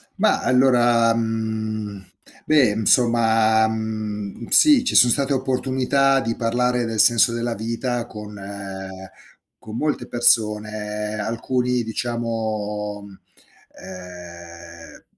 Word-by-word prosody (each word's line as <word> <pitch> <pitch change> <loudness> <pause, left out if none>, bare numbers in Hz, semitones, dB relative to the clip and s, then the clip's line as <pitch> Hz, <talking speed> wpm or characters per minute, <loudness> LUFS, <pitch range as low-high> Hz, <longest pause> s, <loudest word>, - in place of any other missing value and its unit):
Ma - - +1
allora, 120 -3 +3
mhmm 110 -3 -4 0.4
beh, 150 -6 +4
insomma, 110 0 +3
mhmm, 110 -1 -5
sì, 295 -5 +6
ci 250 - -2
so' 120 - +7
state 140 +3 +1
opportunità 130 +1 +1
di 115 -1 -3
parlare 125 +1 -1
del 115 -1 -4
senso 115 0 +5
della 120 0 -3
vita, 115 +2 -3
con 105 -1 -10 1.3
con 110 0 -10
molte 150 +5 -2
persone, 105 -2 0
alcuni 125 +3 -2
diciamo, 110 -3 -4 0.7
ehm, 85 -2 -12
115 Hz, 95 wpm, -21 LUFS, 105-120 Hz, 1.3 s, so